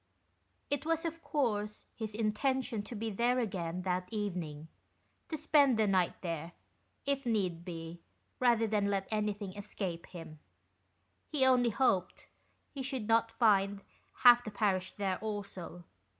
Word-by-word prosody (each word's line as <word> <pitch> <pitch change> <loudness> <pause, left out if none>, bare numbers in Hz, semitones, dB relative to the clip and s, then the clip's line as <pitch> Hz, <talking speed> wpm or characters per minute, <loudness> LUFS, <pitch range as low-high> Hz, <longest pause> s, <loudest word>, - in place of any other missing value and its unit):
It 285 - 0
was, 330 +1 0
of 330 0 -3
course, 210 -9 -1
his 215 -2 -5
intention 230 +2 0
to 240 - -7
be 220 +1 -3
there 240 +5 +2
again 180 -6 -2
that 180 0 -1
evening: 175 -8 -3 0.6
to 315 - -2
spend 290 -5 +4
the 220 - +4
night 190 -3 +2
there, 165 -1 -4 0.5
if 280 -1 0
need 190 -8 0
be, 165 -1 -7 0.4
rather 235 -3 +4
than 210 -2 +1
let 195 -1 -1
anything 210 -2 -2
escape 195 -4 -5
him. 165 -3 -10 0.9
He 285 -4 +2
only 250 -2 +5
hoped 200 -6 +1 0.5
he 275 - -6
should 260 -5 -3
not 230 0 +3
find 200 -3 +3 0.4
half 245 -1 +9
the 220 - -5
parish 195 -3 0
there 195 -3 -1
also. 200 -5 -6
210 Hz, 140 wpm, -33 LUFS, 185-245 Hz, 0.9 s, half